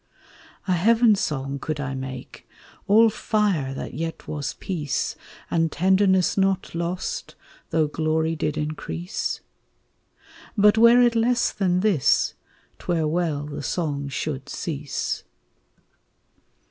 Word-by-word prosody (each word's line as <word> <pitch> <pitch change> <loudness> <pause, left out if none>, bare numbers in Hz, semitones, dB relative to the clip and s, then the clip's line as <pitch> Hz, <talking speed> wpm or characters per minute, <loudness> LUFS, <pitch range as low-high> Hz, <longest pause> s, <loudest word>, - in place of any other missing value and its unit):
A - - +1
heaven 225 +5 +4
song 140 -7 -2
could 155 +1 -3
I 135 -2 -3
make, 130 -1 -7 0.4
all 220 +3 +6
fire 205 - 0
that - - -6
yet 165 +4 -5
was 145 -4 -4
peace, 155 -7 -2 0.4
And 165 -1 +1
tenderness 190 +1 +3
not 195 -1 +1
lost, 170 +2 -3 0.3
though 160 -1 +2
glory 160 +1 0
did 150 -1 -2
increase? 155 +4 -3 1.2
But 210 +1 +6
were 235 +2 +7
it 240 -1 +4
less 235 +1 +2
than 180 -2 +1
this, 190 - +3 0.5
't - - -15
were 165 -3 +1
well 155 -3 -1
the 150 0 -6
song 145 -2 -2
should 140 0 -4
cease. 145 -4 -3
165 Hz, 120 wpm, -24 LUFS, 145-195 Hz, 1.2 s, were